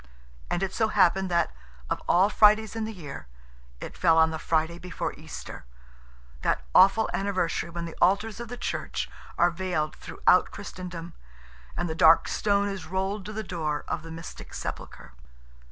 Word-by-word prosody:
And 180 - -1
it 190 - -2
so 220 - +2
happened 190 -2 +3
that, 170 -2 +1 0.4
of - - -2
all 185 +3 +5
Fridays 215 +1 +4
in 225 -1 -2
the 220 - -4
year, 155 - -9 0.5
it - - -8
fell 165 -3 +4
on 160 0 +5
the 160 - -4
Friday 160 +2 0
before 180 0 -4
Easter: - - -9 0.8
that - - 0
awful 205 +3 +6
anniversary 185 -4 -1
when 170 0 -5
the 165 - -8
altars 205 +4 +2
of 235 - -6
the 245 +2 -7
Church - - -3 0.3
are 175 +1 +4
veiled 170 -4 -2
throughout 180 - +2
Christendom, 180 -4 -8 0.6
and 175 - -1
the 160 - -2
dark 160 0 +6
stone 200 -1 +1
is 195 -5 -5
rolled 190 +2 -2
to 215 - -6
the 220 0 -4
door 155 -6 -3
of - - -2
the 165 - -10
mystic 165 +1 -9
sepulchre. - - -7
180 Hz, 170 wpm, -27 LUFS, 165-200 Hz, 0.8 s, awful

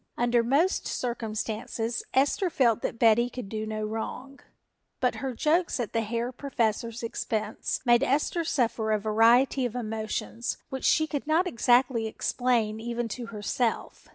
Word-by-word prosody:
Under 240 0 +3
most 285 - +1
circumstances 225 0 -3
Esther 290 +8 +2
felt 235 -7 +2
that - - -3
Betty 230 +1 +4
could 250 -4 -7
do 215 0 -4
no 215 0 -3
wrong, 250 +5 -5 0.6
but 250 -1 +1
her 265 -2 -3
jokes 325 +3 +1
at 235 - -3
the 230 - +1
Herr 235 +3 -2
Professor's 235 -3 -2
expense 220 -1 -3
made 240 0 +5
Esther 295 +5 +1
suffer 230 -7 0
a - - +3
variety 230 +5 +4
of 245 -1 -2
emotions 225 0 -3
which 265 -2 -4
she 315 - +4
could 295 -2 -4
not 320 +4 +3
exactly 245 -6 +2
explain 225 -1 0
even 235 +1 -3
to 235 +2 -5
herself. 225 +2 -3
235 Hz, 150 wpm, -27 LUFS, 220-260 Hz, 0.6 s, made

